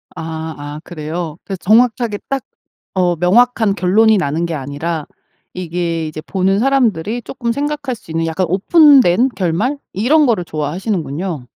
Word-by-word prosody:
아 - - -6 0.4
아. 145 +1 -7
그래요. 160 0 -5
그래서 195 -2 -4
정확하게 225 0 +2
딱 270 -4 -1 0.5
어 180 -2 +1
명확한 210 +4 +3
결론이 215 +4 +4
나는 165 +1 -1
게 165 - -4
아니라 150 +3 -4 0.5
이게 170 -2 -3
이제 155 0 -7
보는 190 +2 0
사람들이 240 -4 +1
쪼끔 235 -2 -3
생각할 285 -1 -2
수 185 - -16
있는 165 0 -1
약간 170 +3 -1
오픈된 255 - +5
결말? 195 - 0
이런 285 +9 +3
거를 210 -8 +1
좋아하시는군요. 155 - -3
185 Hz, 320 characters per minute, -17 LUFS, 165-235 Hz, 0.5 s, 오픈된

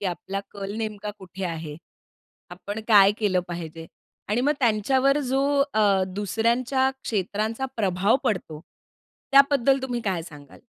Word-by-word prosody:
की 200 - -2
आपला 190 +3 -4
कल 200 0 -6
नेमका 210 -2 -4
कुठे 190 0 -8
आहे? 160 -3 -5 0.7
आपण 200 +4 -6
काय 200 -2 +7
केलं 190 -4 +1
पाहिजे? 165 -1 -7 0.4
आणि 220 +4 +1
मग 290 +3 +2
त्यांच्यावर 260 +5 +2
जो 270 +1 +2 0.3
अ, 200 -3 +3
दुसऱ्यांच्या 235 +6 +1
क्षेत्रांचा 215 +5 -2
प्रभाव 195 +2 +2
पडतो. 165 -6 -2 0.7
त्याबद्दल 275 -1 +5
तुम्ही 245 -2 -2
काय 190 -6 -2
सांगाल? 150 -4 -13
205 Hz, 130 wpm, -24 LUFS, 185-240 Hz, 0.7 s, काय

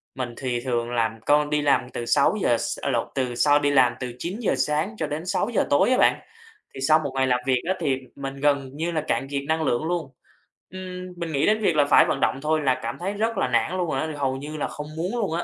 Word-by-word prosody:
mình 125 -2 -4
thì 125 -2 -2
thường 120 -2 -2
làm 115 -2 -1
con 150 0 +3
đi 150 0 +1
làm 135 -3 +2
từ 120 - -5
6:00 140 - +2
s - - -3
à, - - -1
lộn, 120 -3 0
từ 125 -2 -1
sau 145 +3 +4
đi 145 0 +1
làm 130 -3 +4
từ 125 -2 -5
9:00 195 - -1
sáng 150 - -1
cho 155 - -2
đến 155 +4 -4
6:00 210 +4 0
tối 145 +11 +4
á 255 - +4
bạn.Thì 450 - -2
sau 155 +3 +4
một 140 -3 -4
ngày 130 0 +2
làm 125 -1 +2
việc 130 -2 +2
á 190 - +2
thì 135 -2 0 0.2
m 140 - -13
mình 135 0 -4
gần 140 -2 +1
như 165 +3 -2
là 155 -2 -1
cạn 135 - 0
kiệt 140 0 -2
năng 160 0 +1
lượng 120 0 0
luôn. 165 -5 -2 0.6
Ừm, 185 -1 -7
mình 170 -2 -4
nghĩ 140 -1 +1
đến 215 +1 +3
việc 175 -6 +2
là 145 -1 +4
phải - - +6
vận 135 - -1
động 135 - +1
thôi 155 0 +1
là 130 -3 +1
cảm 115 - -4
thấy 195 +3 -2
rất 220 +1 -1
là 130 - +1
nản 145 +9 +1
luôn 175 -3 -1
rồi 135 - -1
á, 160 - -2
hầu 135 -2 -1
như 150 +3 -7
là - - -1
không 150 0 -7
muốn 185 +9 -2
luôn 195 -7 -1
á. 170 - -1
145 Hz, 265 wpm, -24 LUFS, 130-175 Hz, 0.6 s, phải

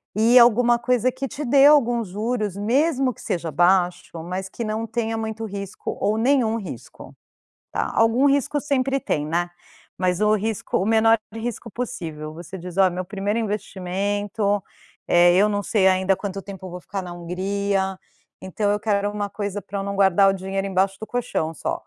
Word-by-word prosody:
E 230 +4 +5
alguma 240 0 +6
coisa 250 0 +1
que 260 +2 -4
te 295 +2 -6
dê 275 +2 +5
algum 245 -6 +4
juros, 210 0 -3
mesmo 260 +4 +1
que - - -15
seja 170 -2 -3
baixo, 175 +2 +3 0.2
mas 190 +2 -4
que 235 - -5
não 215 +1 -2
tenha 225 0 -2
muito 220 0 -4
risco, 200 -2 -6
ou 215 +1 +1
nenhum 235 -2 +2
risco, 175 - -9 0.6
tá. - - -2
Algum 225 +4 +3
risco 285 +1 +1
sempre 275 -1 0
tem, 150 - -2
né. 175 +3 -1 0.5
Mas 180 0 0
o 210 0 +4
risco 220 +1 -2
o 190 - 0
menor 225 +1 +4 0.2
de 225 - -6
risco 230 0 -5
possível. 160 -10 -5
Você 175 +3 -9
diz: 180 +1 -9
“Ó, 190 - +6
é - - +3
meu 180 +1 -4
primeiro 205 +3 -2
investimento. 205 0 -2 0.4
Eh, 175 0 +5
eu 205 +3 +4
não 205 -1 -1
sei 195 -4 +2
ainda 190 +1 +3
quanto 195 0 -5
tempo 195 -1 -9
eu 185 - -8
vou 180 - -7
ficar 195 +2 -5
na 180 -1 -8
Hungria, 190 +2 -2 0.4
então 205 +2 -1
eu 205 - 0
quero 205 -1 0
uma 205 -1 -3
coisa 205 0 -4
para 200 +2 -6
eu 195 - -3
não 200 0 -4
guardar 195 0 +5
o 195 - +2
dinheiro 195 +1 -3
embaixo 190 0 0
do 220 - -6
colchão 240 -10 -2
só”. 155 - -4
205 Hz, 190 wpm, -23 LUFS, 190-225 Hz, 0.6 s, alguma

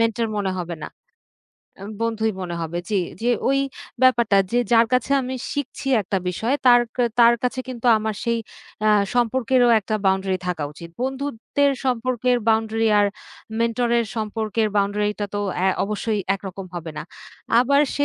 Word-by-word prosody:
Mentor 230 0 +1
মনে 200 -2 -1
হবে 175 -1 -4
না। - - -5 0.9
আম 200 - -7
বন্ধুই 220 -1 0
মনে 175 -1 -4
হবে। 165 +1 -3
জি, - - 0 0.3
জি 235 - 0 0.2
ঐ - - +3 0.5
ব্যাপারটা 235 -5 +4 0.2
যে 240 - +3
যার 230 0 +6
কাছে 250 +1 +1
আমি 255 +1 -4 0.2
শিখছি 285 -1 -5 0.2
একটা 195 +1 -2
বিষয় 220 +8 -1
তার 245 -1 +8 0.2
কা 250 - +2 0.2
তার 235 0 +7
কাছে 250 +1 -1
কিন্তু 250 -1 -5
আমার 215 0 -2
সেই 235 -1 +1 0.5
আ - - +5 0.3
সম্পর্কেরও 245 +1 +2
একটা 215 +1 -3
বাউন্ডারি 190 0 +1
থাকা 175 -4 -2
উচিত। 170 +3 -10
বন্ধুত্বের 275 +1 -1
সম্পর্কের 250 0 +1
বাউন্ডারি 225 0 +2
আর 205 - +4 0.5
মেন্টরের 235 0 +1
সম্পর্কের 220 0 -1
বাউন্ডারিটা 205 +1 0
তো - - -1 0.2
অ্যা 185 +2 +2 0.2
অবশ্যই 210 +1 -2
একরকম 195 -1 -7
হবে 170 -2 -5
না। - - -4 0.6
আবার 280 +3 +3
সে 285 - +1
225 Hz, 155 wpm, -22 LUFS, 205-245 Hz, 0.9 s, তার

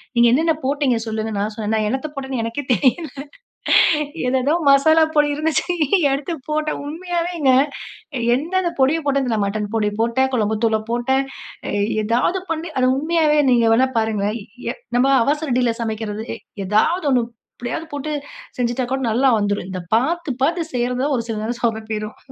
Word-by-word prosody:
"நீங்க 235 0 +5
என்னென்ன 320 +5 +3
போட்டீங்க 275 -3 +1
சொல்லுங்க", 220 0 -3
நான் 210 +2 -1
சொன்னேன், 215 -1 -3
"நான் 215 -1 +1
என்னத்த 265 +6 -2
போட்டேன்னு 265 -3 -3
எனக்கே 230 +5 -3
தெரியல, 270 - +1 1.2
ஏதேதோ 260 +3 +1 0.2
மசாலா 315 +4 +6
பொடி 295 -1 +4
இருந்துச்சு, 310 0 0 0.5
எடுத்து 290 +5 -3
போட்டேன்". 305 0 -1
உண்மையாவேங்க, 340 -2 -1 0.8
எந்தெந்த 345 +6 -1
பொடிய 285 +5 +3
போட்டேன்னு 275 -2 +1
தெரில. 220 -2 0
மட்டன் 205 +1 -3
பொடி 210 -2 +1
போட்டேன், 260 +3 +1
குழம்பு 220 -2 0
தூள 220 -1 +2
போட்டேன். 265 +3 +1 0.5
அ - - -2 0.3
ஏதாவது 245 - +1
பண்ணி 325 +1 -3
அது 255 0 +3
உண்மையாவே 310 0 +2
நீங்க 235 -2 +4
வேணா 255 +3 +4
பாருங்களேன். 215 0 -1 0.3
எ - - -8 0.2
நம்ம 255 +2 +4 0.2
அவசரடில 255 -4 +1
சமைக்கிறது, 220 -1 -3
எ - - -9 0.3
எதாவது 220 - +2
ஒண்ணு, 250 -2 +3 0.3
எப்படியாவது 245 +7 -5
போட்டு, 295 +2 -3 0.5
செஞ்சுட்டா 245 +1 0
கூட 265 - -1
நல்லா 260 +4 +3
வந்துரும். 205 -2 -1
இந்த 185 -1 -4 0.2
பார்த்து, 315 +4 -1
பார்த்து 330 +2 0
செய்யிறது 245 +1 0
தான், 285 -1 +1
ஒரு 230 - -3
சில 220 -2 -2
நேரம் 235 +2 -4
சொதப்பிரும். 220 -2 -2
255 Hz, 155 wpm, -20 LUFS, 225-300 Hz, 1.2 s, மசாலா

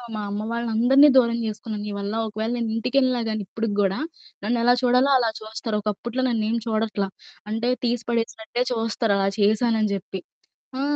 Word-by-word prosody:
మా - - -3
అమ్మ 205 +1 -3
వాళ్ళని 235 0 -2
అందరిని 265 +6 +6
దూరం 235 -3 +5
జేసుకున్నాను 215 -1 -4
నీ 210 - -4
వల్ల. 200 +1 -3
ఒకవేళ 220 +2 -3
నేనింటికెళ్ళినా 245 +2 +1
గానీ 215 -1 -2
ఇప్పటికి 225 +2 -3
గూడా 195 -1 +2 0.5
నన్ను 240 +4 +1
ఎలా 245 +1 +6
చూడాలో 250 +2 +4
అలా 235 -3 +2
చూస్తారు. 220 0 -4
ఒకప్పుట్లా 225 +4 -3
నన్నేమి 230 -1 0
చూడట్లా 215 -2 0 0.4
అంటే 225 +3 -1
తీసి 240 -1 0
పడేసినట్టే 230 0 -2
చూస్తరు 225 -2 0
అలా 195 0 +1
చేశానని 215 +1 +3
జెప్పి. 195 0 -5 0.6
ఆ! - - 0
225 Hz, 160 wpm, -24 LUFS, 215-240 Hz, 0.6 s, అందరిని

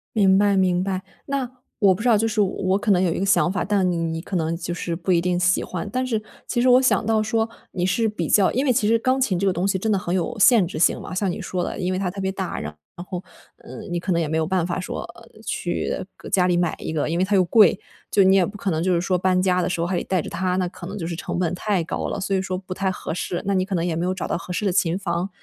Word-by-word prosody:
明 190 -3 +5
白 200 0 +3
明 180 -1 +2
白， 190 -1 -2 0.3
那， 275 -3 -2 0.3
我 195 -3 +5
不 185 - -7
知 245 - +2
道， 225 - +5
就 225 +2 +1
是 220 -1 +1
我 200 - +3
我 190 0 0
可 205 +1 0
能 180 -2 +4
有 175 -3 +1
一 - - -3
个 195 - 0
想 195 -2 +3
法， 185 - -1
但 195 -3 +1
你 175 - 0
你 165 -1 -2
可 190 - -6
能 165 -1 0
就 175 0 -4
是 170 0 -4
不 175 +2 -7
一 170 -2 +4
定 180 0 0
喜 180 0 +2
欢。 185 +3 -5
但 255 +2 -1
是 225 -4 -1 0.3
其 240 - 0
实 255 - +3
我 250 +1 +6
想 255 -3 +2
到 220 0 +2
说， 225 +1 0 0.2
你 180 -1 -1
是 205 +5 +1
比 210 - -3
较 195 -3 +4
因 260 +4 0
为 255 - +3
其 220 -3 +1
实 230 +1 +3
钢 255 +3 +1
琴 195 -9 +1
这 200 - +1
个 190 - +2
东 180 +1 -1
西 195 -1 +1
真 220 - -1
的 200 - +3
很 175 -2 -3
有 190 +6 -1
限 215 -2 +5
制 165 - -7
性 160 - +3
嘛， - - -7
像 190 0 0
你 - - -5
说 180 -1 -3
的， - - -4
因 185 +1 -1
为 - - -1
它 185 -2 -1
特 200 - -8
别 190 - -1
大， 190 -1 -4
然 75 +1 -6 0.3
后， 180 -1 -4 0.4
呃， - - -10
你 175 0 -1
可 185 - -2
能 170 - +2
也 165 - 0
没 160 +1 -1
有 160 - +1
办 175 0 0
法 175 - -2
说， 185 - -4
呃， 230 - -15 0.2
去 175 -3 -2
搁 - - -11
家 180 -2 +3
里 180 -1 +2
买 175 -2 0
一 - - -5
个， 150 -2 -1
因 165 - -1
为 180 - +2
它 200 +2 +1
又 185 - +5
贵。 205 +1 +5 0.3
就 200 - +4
你 190 +1 +5
也 190 -2 +4
不 205 +3 -8
可 200 - -2
能 160 0 -1
就 185 0 +2
是 170 - +2
说 180 +1 0
搬 185 0 +2
家 180 -1 +2
的 - - -1
时 175 - -2
候 170 - 0
还 185 - -1
得 - - -1
带 185 -3 0
着 - - -7
它， 185 0 -1
那 185 -1 0
可 175 0 -10
能 195 +3 -6
就 165 -4 -4
是 170 - -4
成 170 - -4
本 180 -1 0
太 200 0 0
高 - - -3
了， - - -3
所 195 0 -1
以 190 - +1
说 185 -1 -3
不 185 0 -7
太 190 0 -1
合 185 - -5
适， 175 +1 -3
那 200 - +1
你 185 -1 +2
可 195 +1 -5
能 170 -2 0
也 170 -2 -1
没 165 - -1
有 185 - 0
找 185 - -4
到 - - -1
合 175 - -8
适 210 +4 -2
的 190 - +1
琴 180 -2 +1
房。 175 -1 -2
185 Hz, 345 characters per minute, -23 LUFS, 175-200 Hz, 0.4 s, 我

